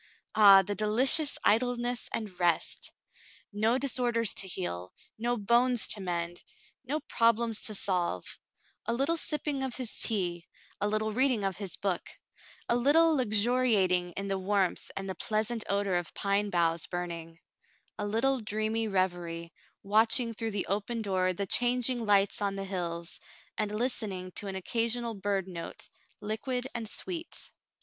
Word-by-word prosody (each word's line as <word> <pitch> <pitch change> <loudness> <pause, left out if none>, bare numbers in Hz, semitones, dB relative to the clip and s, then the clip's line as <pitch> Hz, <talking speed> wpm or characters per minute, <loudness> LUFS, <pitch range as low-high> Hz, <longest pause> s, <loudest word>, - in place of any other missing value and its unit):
Ah! 200 -2 +8
The 205 +2 -3
dehcious 255 +8 +4
idleness 245 +2 +1
and 205 -5 -4
rest! 175 -2 0 0.6
No 220 +4 +2
dis 270 -1 -1
orders 230 -3 +1
to 195 - -3
heal 90 - -5
— - - -36
no 240 0 +1
bones 235 +3 +3
to 205 - -2
mend 175 -1 -3 0.2
— - - -32
no 305 +2 0
problems 230 -4 +2
to 215 - -1
solve; 180 - -1 0.5
a 230 - +1
little 275 +7 +1
sipping 300 -3 -1
of 265 -2 -1
his 255 -4 -3
tea 175 -5 0 0.2
— - - -29
a 205 - +2
little 215 +1 -1
reading 255 -3 +2
of 195 -1 -2
his 200 -3 -5
book 195 -3 -2 0.3
— - - -21
a 235 - +2
little 310 +6 +4
luxuriating 215 -7 +2
in 200 +3 -4
the 195 -1 -1
warmth 195 -1 0
and 195 0 -3
the 190 - -3
pleasant 220 +3 -1
odor 200 -2 +1
of 175 -2 -5
pine 200 +1 +1
boughs 170 -2 +1
burning 170 -2 -5 0.3
— - - -37
a 205 - -2
little 260 +6 +1
dreamy 215 +1 -1
revery, 175 -4 -2 0.3
watching 225 +3 +3
through 225 +1 -3
the 205 -2 -2
open 210 +4 -2
door 185 -2 +1
the 195 +2 -3
changing 245 +3 +3
lights 200 -1 +3
on 200 -1 -1
the 195 0 -4
hills, 170 -3 -4 0.4
and 210 -1 -2
listening 205 -6 -1
to 200 - -5
an 195 - -4
occasional 230 +4 -1
bird 195 -2 -2
note, 170 -3 -8 0.3
liquid 245 +4 -3
and 230 -3 -5
sweet. 340 +4 -4
210 Hz, 160 wpm, -29 LUFS, 190-240 Hz, 0.6 s, Ah